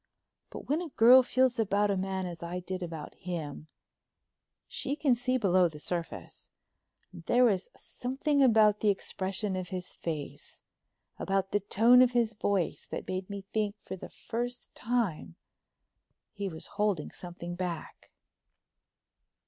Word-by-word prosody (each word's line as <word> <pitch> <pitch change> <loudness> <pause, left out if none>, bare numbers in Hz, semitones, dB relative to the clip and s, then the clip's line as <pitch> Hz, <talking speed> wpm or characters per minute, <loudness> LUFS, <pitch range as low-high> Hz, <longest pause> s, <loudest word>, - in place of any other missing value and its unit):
But - - -9
when 300 +5 +1
a 345 - -5
girl 250 0 +8
feels 255 -1 +2
about 205 -1 +2
a - - +1
man 190 0 -2
as 175 -2 -6
I 170 +1 -4
did 185 +1 -5
about 165 -3 -6
him, 160 -5 -6 1.0
she 280 +1 -2
can 290 -4 +3
see 255 +2 +1
below 185 -5 +4
the 155 - -11
surface, 170 +2 -5 0.6
and 175 - -9
there 245 +1 +4
was 200 -6 +2
something 275 +3 -1
about 215 -5 +5
the 215 - +2
expression 195 0 -1
of 185 -2 -4
his 180 -1 -5
face, 155 -4 -6 0.6
about 195 0 0
the 205 - +2
tone 230 +5 +5
of 250 -1 +4
his 235 -2 +2
voice, 200 -4 -1
that - - -6
made 185 +1 -3
me 200 -1 -6
think 210 -1 0
for 190 - -7
the 185 - -9
first 245 +1 -5
time 210 - -1 1.0
he 200 -1 -3
was 160 -2 -8 0.2
holding 200 -8 0
something 175 -1 -7
back. 175 -2 -5
200 Hz, 150 wpm, -30 LUFS, 180-240 Hz, 1.0 s, girl